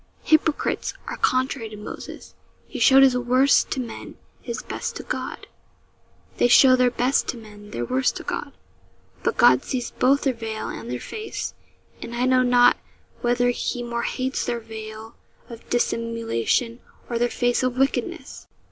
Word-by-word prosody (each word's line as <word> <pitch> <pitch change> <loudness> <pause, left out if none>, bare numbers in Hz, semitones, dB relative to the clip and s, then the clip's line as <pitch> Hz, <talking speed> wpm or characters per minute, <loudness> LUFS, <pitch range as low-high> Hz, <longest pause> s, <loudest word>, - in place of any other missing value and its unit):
Hypocrites 315 -1 +1
are - - -5
contrary 255 -2 0
to 210 - -10
Moses. 210 - -9 0.3
He - - -7
showed 270 0 +7
his 260 -2 +5
worst 255 +3 +3
to - - -2
men, 240 -3 -7 0.3
his 230 -3 -5
best - - -5
to - - -6
God; - - -5 0.9
they - - +4
show 255 +1 +7
their 250 -1 +3
best 250 +3 +1
to 245 - -3
men, 210 -2 -13
their 120 -10 -4
worst 130 +2 0
to - - -6
God; - - -4 0.7
but - - -1
God 125 +1 +6
sees 250 -2 -3
both 275 +2 +2
their 270 - +1
veil 225 -2 -5
and 115 +1 -7
their 125 0 -3
face, 435 - -6 0.5
and 235 0 -6
I 245 +1 0
know 255 0 +4
not 245 -1 +5 0.4
whether 245 0 +2
He 245 0 -3
more 235 0 -3
hates 260 +2 -2
their 235 - -2
veil 220 0 -9 0.3
of 230 -1 -12
dissimulation 230 - -1 0.3
or 235 -1 -2
their 240 0 +2
face 245 0 0
of 255 -1 -1
wickedness.' 270 +1 -2
240 Hz, 165 wpm, -23 LUFS, 225-255 Hz, 0.9 s, showed